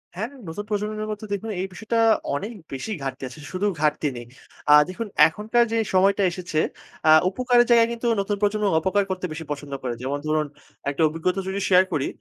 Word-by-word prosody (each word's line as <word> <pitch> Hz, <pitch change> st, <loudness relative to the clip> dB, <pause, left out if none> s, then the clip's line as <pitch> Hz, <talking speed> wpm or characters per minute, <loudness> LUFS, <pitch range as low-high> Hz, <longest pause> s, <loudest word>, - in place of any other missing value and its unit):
হ্যাঁ 210 Hz, +5 st, -2 dB, 0.2 s
নতুন 165 Hz, +6 st, -5 dB
প্রজন্মের 215 Hz, +1 st, -2 dB
মধ্যে 215 Hz, 0 st, -6 dB
দেখুন 220 Hz, +3 st, -4 dB
এই 190 Hz, -, -2 dB
বিষয়টা 225 Hz, +4 st, -3 dB, 0.4 s
অনেক 205 Hz, +10 st, -4 dB, 0.2 s
বেশি 135 Hz, +11 st, -5 dB
ঘাটতি 135 Hz, 0 st, -5 dB
আছে, 130 Hz, -, -12 dB
শুধু 185 Hz, +2 st, -2 dB, 0.2 s
ঘাটতি 150 Hz, 0 st, +1 dB
নেই। 120 Hz, -, -7 dB, 0.4 s
আ -, -, +7 dB, 0.2 s
দেখুন 220 Hz, +5 st, -5 dB, 0.2 s
এখনকার 220 Hz, +8 st, +1 dB
যে 230 Hz, -, +1 dB, 0.2 s
সময়টা 195 Hz, +2 st, +4 dB
এসেছে 175 Hz, -3 st, -3 dB, 0.5 s
আ -, -, +7 dB, 0.2 s
উপকারের 245 Hz, +3 st, +3 dB
জায়গায় 230 Hz, -1 st, +5 dB
কিন্তু 235 Hz, +1 st, -3 dB
নতুন 200 Hz, +1 st, 0 dB
প্রজন্ম 210 Hz, +1 st, +1 dB
অপকার 190 Hz, +4 st, +1 dB
করতে 185 Hz, -1 st, -3 dB
বেশি 160 Hz, +1 st, -6 dB
পছন্দ 145 Hz, -1 st, -5 dB
করে। 125 Hz, -2 st, -2 dB
যেমন 135 Hz, +3 st, -2 dB
ধরুন 155 Hz, -1 st, +1 dB, 0.4 s
একটা 140 Hz, +2 st, -3 dB
অভিজ্ঞতা 165 Hz, +4 st, -1 dB
যদি 195 Hz, +1 st, -2 dB
শেয়ার 185 Hz, -1 st, +7 dB
করি, 145 Hz, -3 st, 0 dB
190 Hz, 185 wpm, -24 LUFS, 155-215 Hz, 0.5 s, আ